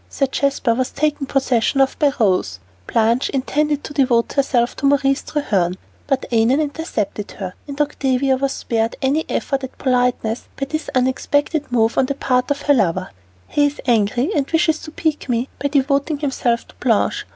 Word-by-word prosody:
Sir 275 - 0
Jasper 270 -2 0
was 255 +2 -1
taken 295 -1 -1
possession 260 -1 +1
of 270 0 +3
by 290 -2 +4
Rose, 185 - +1 0.3
Blanche 230 +3 +2
intended 295 +2 0
to - - -7
devote 250 -5 +2
herself 255 -4 +1
to 280 - +1
Maurice 275 -1 +2
Treherne, 190 - -1 0.3
but 270 -1 0
Annon 235 +4 +3
intercepted 285 - -3
her, 185 -2 -6
and 280 0 -7
Octavia 270 -2 +1
was 270 +1 -1
spared 225 -2 -1
any 285 +4 +1
effort 275 -1 -1
at 265 - -7
politeness 250 -3 0
by 275 - 0
this 310 +3 -4
unexpected 285 +3 0
move 230 -1 +2
on 260 - +2
the 280 - -2
part 255 -1 0
of 285 0 -1
her 290 - +4
lover. 185 -6 0 0.4
"He 290 -1 +2
is 290 - -6
angry, 240 - +2
and 280 -2 0
wishes 320 -1 +2
to 310 - -9
pique 310 -3 -2
me 240 +2 0
by 285 - +1
devoting 280 +2 +1
himself 260 -5 -1
to - - -17
Blanche. 230 -4 +1
270 Hz, 175 wpm, -20 LUFS, 235-285 Hz, 0.4 s, by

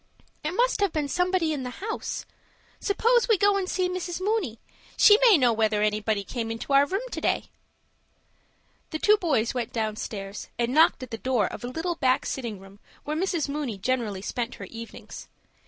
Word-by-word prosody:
"It 305 +3 -2
must - - +2
have 400 -3 +2
been 300 -2 -1
somebody 360 +1 +1
in 285 - -3
the 250 - -4
house. 440 +3 -4 0.5
Suppose 465 +4 +2
we 445 -3 +4
go 405 +2 +4
and 385 -2 -1
see 370 -1 +1
Mrs. 360 -1 -4
Mooney. 375 - -1 0.4
She 420 0 +7
may 405 - +7
know 245 -4 +3
whether 215 -1 +1
anybody 210 -1 0
came 225 +3 -4
into 225 +5 -4
our 280 +1 +6
room 390 +8 -2
to - - -4
day." - - -1 1.4
The 315 - -3
two 420 +6 +4
boys 290 - +1
went 245 -3 -3
downstairs, 215 -2 -4
and 240 +1 0
knocked 315 -3 +4
at 250 - -9
the 225 - -5
door 255 -3 +1
of - - -6
a - - -3
little 330 +6 -3
back 260 -4 +2
sitting 235 -6 -4
room 195 +1 -15 0.2
where 300 - -3
Mrs. 340 -2 0
Mooney 280 -7 -3
generally 210 -3 -2
spent 240 +2 -3
her - - -8
evenings. 230 0 -10
275 Hz, 190 wpm, -26 LUFS, 225-365 Hz, 1.4 s, She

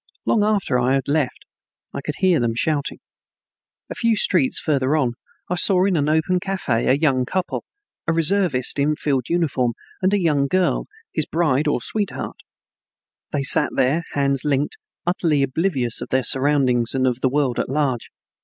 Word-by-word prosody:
Long 215 - +2
after 205 -11 +1
I 125 +2 +2
had 135 - -2
left 145 -2 -1 0.5
I - - -4
could 150 +1 -4
hear 185 -4 +3
them 115 -2 0
shouting. 145 +3 -1 0.9
A - - -6
few 230 -1 +1
streets 175 -9 +1
farther 140 -1 +1
on 130 -5 0 0.3
I - - -2
saw 185 0 +4
in 195 -2 +1
an 150 -1 +1
open 160 +4 +1
cafe 175 -12 -1
a - - +5
young 135 -4 +2
couple, 185 +8 -3 0.4
a - - +3
reservist 165 -6 +2
in 150 +2 +2
field 135 -5 -1
uniform 145 -8 0 0.3
and 185 +1 +2
a 205 - +2
young 150 -6 +1
girl, 185 +4 0 0.3
his 155 - 0
bride 155 -3 +1
or 145 - 0
sweetheart. 205 - -4 0.9
They 140 - -1
sat 140 - +3
there, 140 +6 +2
hands 140 -2 +1
linked, 145 -1 0 0.3
utterly 165 -5 +1
oblivious 135 -4 -1
of - - -6
their 130 0 +1
surroundings 130 -3 +2
and 130 0 +1
of 125 0 -1
the 130 - +2
world 135 -3 0
at - - -2
large. 135 -4 -1
145 Hz, 175 wpm, -21 LUFS, 130-175 Hz, 0.9 s, a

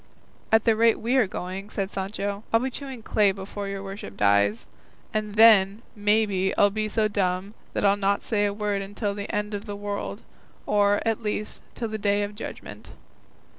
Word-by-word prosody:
"At 220 0 +5
the 225 -2 +4
rate 230 +1 +4
we 240 +4 0
are 245 -6 +4
going," 190 +2 -6
said 195 -2 -3
Sancho, 200 +1 -3
"I'll 225 - +5
be 260 +2 -2
chewing 265 -4 -7
clay 210 -2 +3
before 200 +1 -6
your 195 0 -5
worship 195 - -8
dies; 100 +2 +3 0.5
and 215 -1 -2
then, 215 -1 +6
maybe, 205 -2 +1
I'll 205 - +5
be 215 +1 -1
so 215 0 +1
dumb 195 -1 -1 0.2
that - - 0
I'll 200 0 +4
not 200 0 +1
say 205 -2 +1
a - - -1
word 205 -1 -1
until 200 +1 -3
the 200 0 -5
end 210 0 -2
of 205 +1 -4
the 205 - -4
world, 205 0 -5 0.4
or, 205 0 +3
at 225 0 0
least, 210 -1 -4
till 235 - -3
the 215 0 -4
day 205 0 +2
of 205 0 -4
judgment." 210 - -9
205 Hz, 190 wpm, -25 LUFS, 195-215 Hz, 0.5 s, then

